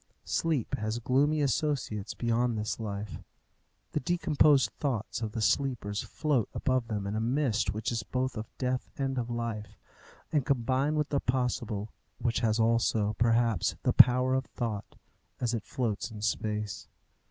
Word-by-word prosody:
Sleep 155 -8 0
has 110 +2 -1
gloomy 140 +6 +2
associates 130 -6 -1
beyond 120 0 +1
this 105 +2 -2
life: 105 -1 -4 0.7
the - - 0
decomposed 145 -6 +3
thoughts 120 -4 -2
of 110 -2 -3
the 110 - -1
sleepers 115 -6 +1
float 145 -8 0
above 130 -3 +1
them 105 -3 -3
in 100 +2 -2
a - - 0
mist 120 -3 +1
which 110 +2 -2
is 115 -2 -1
both 130 +4 -2
of 110 0 -5
death 125 -1 -1
and 135 -2 -1
of 120 -1 -3
life, 110 -3 -4 0.5
and 150 -4 +2
combine 135 +2 +1
with 150 -1 0
the 140 - +1
possible, 120 -5 -1 0.3
which 120 -2 0
has 110 0 +1
also, 110 -2 +2
perhaps, 115 -2 +2
the - - +2
power 125 +1 +7
of 130 0 +1
thought, 110 -4 -4 0.4
as 120 -1 0
it 115 -3 -3
floats 120 -2 -2
in 105 -2 -8
space. 105 -2 -2
120 Hz, 155 wpm, -30 LUFS, 110-130 Hz, 0.7 s, power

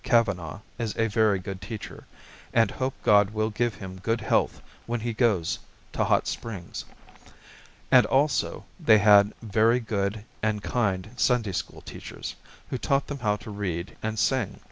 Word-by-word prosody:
Kavanagh 100 - +1 0.2
is 115 -3 -3
a 115 - +3
very 110 -2 +3
good 95 0 -6
teacher, 105 +2 -8 0.5
and 115 -3 +4
hope 130 0 -2
God 105 -1 +5
will 110 +1 -1
give 115 0 0
him 95 -2 -8
good 115 +2 0
health 110 - +1 0.3
when 120 -1 -2
he 120 +1 -2
goes 110 -8 +1 0.3
to - - +1
Hot - - +2
Springs. 100 -7 -5 1.1
And - - +7
also, 145 +2 +1
they 110 - +6
had 105 0 +6
very 110 +3 +3
good 105 -2 -2 0.2
and 110 -1 0
kind 105 -4 -1
Sunday 125 -5 +2
school 90 - -4
teachers, - - -8 0.4
who 130 - -2
taught 140 +1 +1
them 145 -1 -6
how 105 -4 +1
to 105 - -9
read 95 -4 -4
and 110 0 -3
sing. 110 -4 0
110 Hz, 160 wpm, -26 LUFS, 100-115 Hz, 1.1 s, And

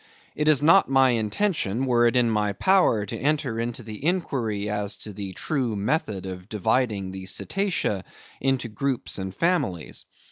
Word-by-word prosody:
"It 150 - -1
is 150 -2 +5
not 165 +3 +6
my 135 -1 +5
intention, 120 - 0
were 120 -2 +4
it 120 - +1
in 125 -1 +4
my 105 -2 +1
power, 180 - +3
to - - -5
enter 145 -5 0
into 120 +1 -4
the 110 +2 -8
inquiry 125 - -1
as 105 -1 -2
to 105 - -8
the 95 -1 -6
true 125 - -2
method 100 - -1
of 95 +1 -7
dividing 105 -2 0
the 95 0 -7
cetacea 165 - -1 0.4
into 135 -2 0
groups 130 0 -3
and 95 0 -4
families. 95 - -1
115 Hz, 165 wpm, -25 LUFS, 100-140 Hz, 0.4 s, not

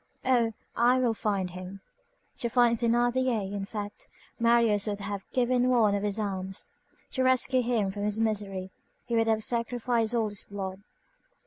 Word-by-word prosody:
Oh! 240 -3 +3 0.2
I 245 +2 +4
will 245 -3 +2
find 200 -4 -1
him!" 185 +2 -8 0.6
To 235 - -2
find 240 -1 +4
Thénardier, 240 -3 +1
in 200 -1 -3
fact, 205 0 -6 0.3
Marius 230 -3 +3
would 205 -1 -2
have 200 -1 -5
given 250 0 +2
one 225 -5 +4
of 200 - 0
his 205 0 0
arms, 190 -2 -4 0.4
to 260 - -1
rescue 260 0 +3
him 230 -5 0
from 205 +1 -6
his 210 +1 0
misery, 200 -4 -1 0.3
he 235 - -2
would 225 0 +2
have 220 -1 +2
sacrificed 235 0 0
all 225 -2 +1
his 205 -1 -3
blood. 195 -1 -6
220 Hz, 160 wpm, -28 LUFS, 200-240 Hz, 0.6 s, I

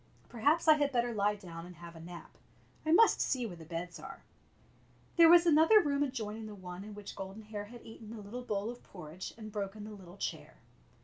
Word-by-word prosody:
Perhaps 290 +9 +2
I 310 -1 +8
had 290 -1 +1
better 240 -2 +1
lie 205 0 +2
down 170 -5 -9
and 180 - -11
have 170 +1 -11
a - - -10
nap. 170 +1 -10 0.6
I - - +3
must 445 +7 +6
see 255 -3 0
where 190 -6 -6
the 165 -1 -11
beds 170 +1 -5
are," 270 +1 -10 0.9
There 335 -1 +8
was 345 0 +8
another 325 +6 +7
room 285 -6 +1
adjoining 225 -5 -3
the 210 - -8
one 180 -1 -8
in 210 0 -9
which 205 -1 -8
Golden 195 +3 -7
Hair 210 -1 -6
had 240 +3 -12
eaten 225 -1 -11
the 225 0 -7
little 230 +5 -6
bowl 210 -2 -2
of 245 - -11
porridge 175 -1 -8
and 215 -1 -8
broken 205 0 -4
the 215 - -8
little 190 -3 -12
chair. - - -4
215 Hz, 220 wpm, -33 LUFS, 190-255 Hz, 0.9 s, I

